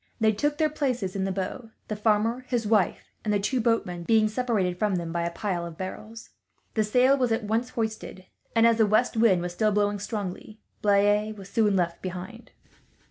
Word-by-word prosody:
They 220 -1 +4
took 290 +8 -1
their 310 - +3
places 250 -11 -2
in 190 -1 -1
the 195 - -1
bow; 200 +5 -4 0.2
the 215 - -3
farmer, 220 +3 +1
his 240 -3 -1
wife, 210 -4 +1
and 215 - -1
the 205 - +2
two 245 +5 0
boatmen 220 -7 0
being 215 +4 +3
separated 215 -7 -1
from 210 -3 +1
them 170 -2 -3
by 170 0 -1
the - - 0
pile 175 0 -3
of 170 -1 -8
barrels. 215 +4 -8 0.4
The 220 - +2
sail 250 +6 +4
was 250 -4 0
at 225 +1 0
once 225 +4 -1
hoisted 220 -4 -4 0.3
and, 225 0 +5
as 230 -1 +4
the 220 - +5
west 215 +4 +2
wind 215 -6 +4
was 175 0 -4
still 215 +4 +1
blowing 205 0 +1
strongly, 205 0 -5 0.2
Blaye 205 +1 +3
was 195 -1 -11
soon 210 -3 +2
left 170 -2 -1
behind. 185 +6 -7
215 Hz, 200 wpm, -26 LUFS, 190-230 Hz, 0.4 s, and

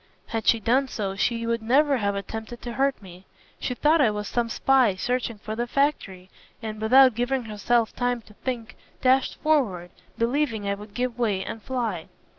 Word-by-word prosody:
Had 225 -1 -3
she 230 - +5
done 255 +5 +2
so, 200 -6 -3
she 230 +3 0
would 230 0 -1
never 275 +5 +3
have 200 -3 -1
attempted 220 +4 -6
to 240 - -5
hurt 270 +2 +1
me. 185 0 -13 0.3
She 250 - -3
thought 305 +5 +3
I 245 - +5
was 210 -1 -4
some 240 -1 -1
spy 255 -4 +3
searching 245 +2 -2
for 215 +1 -6
the 240 +2 -2
factory, 205 -10 -1 0.3
and 215 -2 -6
without 255 +3 +6
giving 245 +3 -1
herself 225 +1 0
time 245 -1 -1
to 210 - -18
think 240 0 -5 0.3
dashed 260 +1 +3
forward, 215 - +1 0.3
believing 230 -3 0
I 200 - +1
would 205 +1 -10
give 245 -1 -2
way 205 -5 0
and 225 - -6
fly. 225 -9 -3
230 Hz, 185 wpm, -25 LUFS, 210-255 Hz, 0.3 s, without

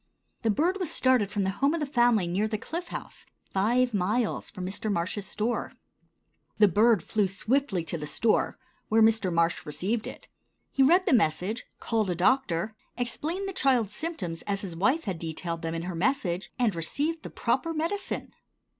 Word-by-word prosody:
The 225 - +1
bird 345 - +1
was 360 -5 -1
started 255 -6 +3
from 205 -1 -1
the 190 - +1
home 285 +4 +4
of - - -2
the 300 - 0
family 240 -7 +3
near 185 +5 0
the 215 0 -2
Cliff 340 +10 -5
House, - - -8 0.3
five 240 +5 +2
miles 210 +4 0
from 185 - -6
Mr. 200 +3 -2
Marsh's 195 +2 -2
store. 230 +3 -2 0.8
The 210 -1 +7
bird 210 0 +4
flew 210 -2 +1
swiftly 215 - 0
to 165 +1 -4
the 150 - -4
store, 220 +9 +1 0.3
where 220 +1 +5
Mr. 220 -4 +3
Marsh 170 0 +1
received 185 +10 -2
it. - - -9 0.4
He 270 - +1
read 350 +8 +5
the 340 - +3
message, 205 +2 +1
called 220 -4 0
a 175 - 0
doctor, 210 -1 +1 0.2
explained 315 +10 -2
the 390 - -4
child's 245 - +2
symptoms 200 - -4
as 200 -1 -1
his 180 -4 -6
wife 260 - +2
had 190 -6 -3
detailed 165 +1 -4
them 165 0 -3
in 165 - -3
her 180 +1 -4
message, 180 -3 -1
and 235 -5 +2
received 290 - -1
the - - -7
proper 330 - 0
medicine. 330 +6 -3
215 Hz, 180 wpm, -28 LUFS, 180-265 Hz, 0.8 s, The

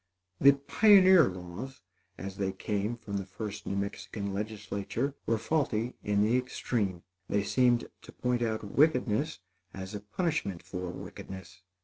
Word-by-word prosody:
The 140 +1 +8
pioneer 185 - +6
laws, 90 +9 -8 0.3
as 95 0 -6
they 95 -1 -1
came 105 +4 -2
from 100 -3 -5
the 95 - -3
first 105 +2 -6
New 100 - -1
Mexican 100 0 -3
legislature, 105 +5 -3
were 115 - +3
faulty 120 -3 0
in 105 0 +2
the 115 +4 +3
extreme. 105 -7 -2 0.3
They 100 -1 +1
seemed 120 +2 +3
to - - -12
point 125 -1 -1
out 110 -2 -1
wickedness 125 - +2 0.3
as 95 +1 -6
a 105 - -3
punishment 105 - -2
for 90 0 -5
wickedness. 90 0 -9
105 Hz, 140 wpm, -30 LUFS, 100-125 Hz, 0.3 s, The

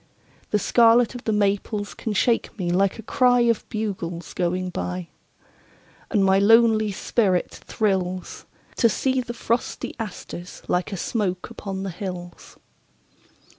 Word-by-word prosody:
The 210 - +2
scarlet 230 +3 +4
of 245 - -9
the 220 - +1
maples 205 0 0
can 220 - -4
shake 230 +4 +1
me 175 -3 -1
like 195 +2 +2
a 225 - -9
cryOf 245 -1 +3
bugles 185 -6 -4
going 180 +1 -1
by. 180 0 -4 1.0
And 205 -4 +2
my 190 0 +4
lonely 220 0 +5
spirit 190 -2 0
thrillsTo 190 +3 -1
see 260 +3 0
the 240 -1 -7
frosty 235 +1 -2
asters 180 -4 -7
like 180 +3 0
a 195 - -3
smoke 190 0 -2
upon 195 -4 -5
the 195 - -3
hills. 175 -1 -8
205 Hz, 130 wpm, -24 LUFS, 185-230 Hz, 1.0 s, lonely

